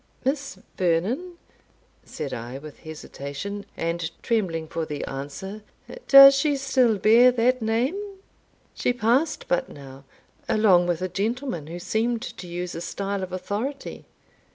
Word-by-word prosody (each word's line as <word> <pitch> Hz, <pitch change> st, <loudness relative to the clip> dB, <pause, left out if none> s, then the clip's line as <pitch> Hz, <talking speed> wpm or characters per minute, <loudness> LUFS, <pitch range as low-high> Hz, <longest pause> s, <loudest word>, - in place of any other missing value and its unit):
"Miss 275 Hz, -4 st, -2 dB, 0.2 s
Vernon?" 190 Hz, -, 0 dB, 0.7 s
said 145 Hz, -3 st, -6 dB
I, 120 Hz, +3 st, -6 dB
with 150 Hz, +1 st, -11 dB
hesitation, 160 Hz, +5 st, -7 dB
and 165 Hz, 0 st, -2 dB
trembling 175 Hz, -9 st, -1 dB
for 165 Hz, +1 st, -3 dB
the 150 Hz, -2 st, -4 dB
answer 145 Hz, +10 st, -7 dB, 0.5 s
"Does 275 Hz, 0 st, +10 dB
she 280 Hz, +1 st, +1 dB
still 260 Hz, -5 st, +2 dB
bear 230 Hz, +5 st, +6 dB
that 250 Hz, +1 st, +2 dB
name? 270 Hz, -, -1 dB, 0.6 s
She 245 Hz, -, 0 dB
passed 245 Hz, +7 st, +1 dB
but 175 Hz, -, 0 dB
now, 135 Hz, -1 st, -12 dB, 0.5 s
along 190 Hz, -5 st, +4 dB
with 175 Hz, 0 st, -1 dB
a -, -, 0 dB
gentleman 215 Hz, -, -3 dB
who 170 Hz, +2 st, -6 dB
seemed 220 Hz, +6 st, -1 dB
to 180 Hz, -, -8 dB
use 175 Hz, +1 st, -5 dB
a 165 Hz, -, -6 dB
style 200 Hz, +2 st, -3 dB
of 185 Hz, -1 st, -5 dB
authority." 205 Hz, +10 st, -4 dB
200 Hz, 135 wpm, -24 LUFS, 165-250 Hz, 0.7 s, Does